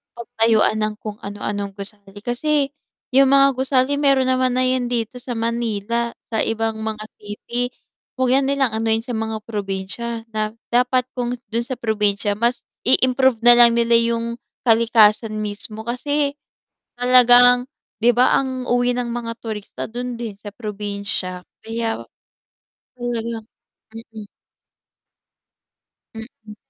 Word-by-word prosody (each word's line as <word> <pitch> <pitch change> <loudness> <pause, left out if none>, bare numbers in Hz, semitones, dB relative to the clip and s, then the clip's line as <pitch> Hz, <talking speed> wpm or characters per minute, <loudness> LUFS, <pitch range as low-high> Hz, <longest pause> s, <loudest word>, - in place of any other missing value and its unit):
pagtayuan 225 -2 +1
ng 215 0 0
kung 210 -1 -6
ano-anong 200 0 -5
gusali. 200 0 -10
Kasi 280 +3 0 0.4
yung 270 +1 +5
mga 275 0 +7
gusali 265 +1 +1
meron 275 -3 +3
naman 255 -1 +2
na 255 - +2
yan 255 -1 +1
dito 235 0 -2
sa 245 0 -5
Manila, 230 0 -2 0.2
sa 220 - 0
ibang 225 0 -1
mga 220 -1 -4
city, 240 +4 -4 0.4
'wag 255 -1 +1
na - - 0
nilang 275 -4 +1
anuhin 225 0 0
sa 245 - -6
mga 220 -1 -3
probinsya. 210 +2 -4
Da 215 0 -2 0.2
dapat 250 +1 +3
kung 245 0 -1 0.2
dun 235 +1 -1
sa 260 - -4
probinsya, 210 -3 0
mas 240 +1 +1 0.3
i 255 - +7
improve 260 -2 +3
nalang 240 -1 +7
nila 235 0 +3
yung 235 0 -1 0.3
kalikasan 225 -2 +4
mismo 210 +1 -6
kasi 285 +4 -1 0.6
talagang, 245 0 +7 0.4
'di 240 +1 +5
ba, 245 +2 +4
ang 260 -1 -2
uwi 245 0 +2
ng 245 -1 -2
mga 235 -1 -4
turista 215 -3 -6
dun 245 +1 -5
din 220 -4 -5
sa 205 0 -10
probinsya. 200 -4 -4 0.2
Kaya 225 0 -3 0.9
talagang 235 -2 -4 0.7
mm. 215 -2 -9 1.9
Mm. 220 -1 -11
235 Hz, 130 wpm, -21 LUFS, 215-245 Hz, 1.9 s, mga